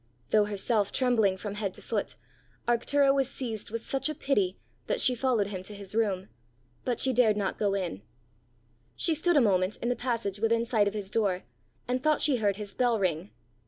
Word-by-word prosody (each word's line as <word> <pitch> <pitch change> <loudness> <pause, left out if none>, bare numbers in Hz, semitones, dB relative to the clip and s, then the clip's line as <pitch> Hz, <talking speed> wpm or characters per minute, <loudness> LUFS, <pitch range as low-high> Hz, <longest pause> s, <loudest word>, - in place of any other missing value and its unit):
Though 210 -1 +5
herself 205 0 0
trembling 225 -7 +2
from 205 +1 -5
head 205 -2 -3
to - - -9
foot, - - -2 0.5
Arctura 275 +4 +3
was 270 -1 +1
seized 230 -6 -4
with 230 +1 -5
such 270 +3 -1
a 305 - -3
pity, 205 -11 0 0.3
that - - 0
she 255 - +5
followed 240 -5 +1
him 190 -3 -5
to 205 +3 -7
his 200 -1 -6
room; 200 -4 0 0.5
but 245 -2 -1
she 265 - +4
dared 225 -4 +4
not 200 -2 -2
go 200 -2 +1
in. 180 - -3 0.9
She 330 - +2
stood 320 +1 +2
a - - +6
moment 190 -3 +2
in 240 - -2
the 245 - +1
passage 230 -6 -2
within 230 +1 +2
sight 220 -4 +2
of 205 - -2
his 200 -2 -5
door, 200 -5 0 0.4
and 250 +1 -1
thought 305 +1 +2
she 280 -4 +3
heard 205 -3 +1
his 205 -1 -7
bell 245 -2 +2
ring. 180 0 -1
220 Hz, 200 wpm, -28 LUFS, 200-250 Hz, 0.9 s, a